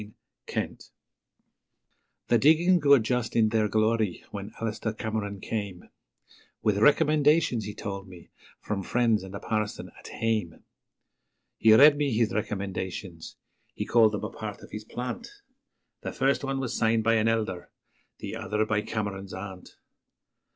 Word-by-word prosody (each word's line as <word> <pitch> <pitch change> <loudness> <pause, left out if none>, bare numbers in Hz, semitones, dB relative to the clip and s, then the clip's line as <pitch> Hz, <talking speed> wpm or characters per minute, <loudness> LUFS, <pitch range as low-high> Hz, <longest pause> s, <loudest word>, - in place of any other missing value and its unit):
Cameron's - - -4
Heart - - -42 1.4
The 120 - +5
diggings 160 +5 +4
were 140 -1 +7
just 120 0 -1
in 110 -2 +4
their 110 -1 +2
glory 110 -2 0
when 100 +1 -6
Alister 110 0 -3
Cameron 110 -2 -4
came, 100 -4 -5 0.7
With 105 -2 +2
recommendations, 150 -2 +3
he 105 - -6
told 100 -2 -6
me, 90 -2 -14 0.3
from 105 -2 -3
friends 115 +1 +1
and 95 +1 -9
a - - -5
parson 110 -2 -3
'at - - -12
hame'; 110 -7 -2 1.0
He 110 -1 +7
read 145 +4 +8
me 145 -2 0
his 115 -1 +1
recommendations 95 -4 -4 0.4
he - - -3
called 110 -2 +4
them 105 - -3
a - - -4
part - - -7
of - - -13
his 105 0 -7
plant 125 - -5 0.7
The - - -4
first 135 +2 +1
one 135 0 -2
was 130 -3 -3
signed 115 0 +2
by 115 +1 +3
an 110 0 +2
Elder, 110 -6 -1 0.5
the - - -6
other 105 0 -1
by 110 -1 0
Cameron's 100 -3 -4
aunt. 95 -1 -9
110 Hz, 150 wpm, -27 LUFS, 100-120 Hz, 1.4 s, read